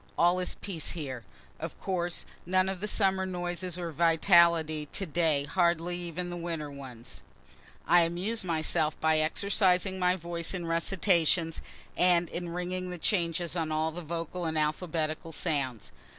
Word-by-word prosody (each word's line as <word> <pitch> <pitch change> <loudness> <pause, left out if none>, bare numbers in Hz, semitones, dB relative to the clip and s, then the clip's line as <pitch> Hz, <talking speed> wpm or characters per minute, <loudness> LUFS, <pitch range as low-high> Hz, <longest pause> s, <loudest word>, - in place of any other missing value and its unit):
All 175 +2 +4
is 180 - -2
peace 175 -6 -5
here. 135 -8 -5 0.4
Of - - -6
course, 175 -2 -2 0.2
none 185 +1 +3
of 190 -1 -4
the 210 - -3
summer 190 -3 +2
noises 175 -1 -3
or 170 -2 -4
vitality; 165 -1 +4
to 195 - -2
day 160 -3 +2
hardly 170 +1 +1
even 175 +1 -4
the - - -4
winter 165 -4 -4
ones. 125 - -9 0.7
I 175 0 +6
amuse 180 +7 0
myself 160 -2 +1
by 160 0 +3
exercising 190 +3 +2
my 180 0 +3
voice 170 0 -3
in 175 -2 -4
recitations, 165 -1 +1 0.3
and 175 -1 +3
in 175 0 -4
ringing 180 +1 -3
the 180 - -5
changes 170 -2 0
on 160 -2 -1
all 155 +1 0
the 175 +2 -6
vocal 170 +2 -4
and 160 -1 -1
alphabetical 155 +1 -1
sounds. 140 - -2
170 Hz, 150 wpm, -29 LUFS, 160-180 Hz, 0.7 s, I